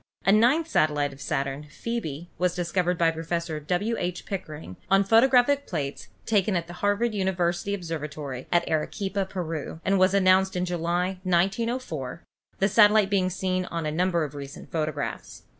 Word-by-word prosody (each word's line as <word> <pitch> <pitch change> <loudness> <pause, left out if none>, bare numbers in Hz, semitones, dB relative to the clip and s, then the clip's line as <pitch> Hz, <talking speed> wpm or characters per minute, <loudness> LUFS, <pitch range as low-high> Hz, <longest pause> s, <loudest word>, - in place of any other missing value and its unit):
A 195 - +5
ninth 250 +10 +4
satellite 150 - +1
of 135 - -14
Saturn, 140 +2 -3
Phcebe, 175 -5 -5
was 180 -1 +1
discovered 180 0 0
by 165 -1 +3
Professor 165 0 -3
W. 180 +9 -1
H. 180 0 -3
Pickering 155 - -6
on 195 +1 +5
photographic 250 +6 +4
plates 145 -5 -4 0.2
taken 205 -2 +2
at 170 -1 0
the 175 - -10
Harvard 205 +3 +1
Observatory 170 -7 -2
at 175 0 +2
Arequipa, 190 +5 -1
Peru, 165 -5 -5
and 195 0 +3
was 185 +1 +4
announced 190 0 +4
in 180 0 0
July, 175 +2 -1
1904, 185 - -1 0.3
the 195 - +2
satellite 210 -1 +5
being 185 -2 +2
seen 185 0 -1
on 165 -3 -4
a 150 - -1
num 180 +4 +1
ber 170 -3 +1
of 150 -2 -5
recent 140 -1 -9
photographs. 155 -2 -4
180 Hz, 160 wpm, -26 LUFS, 160-195 Hz, 0.3 s, A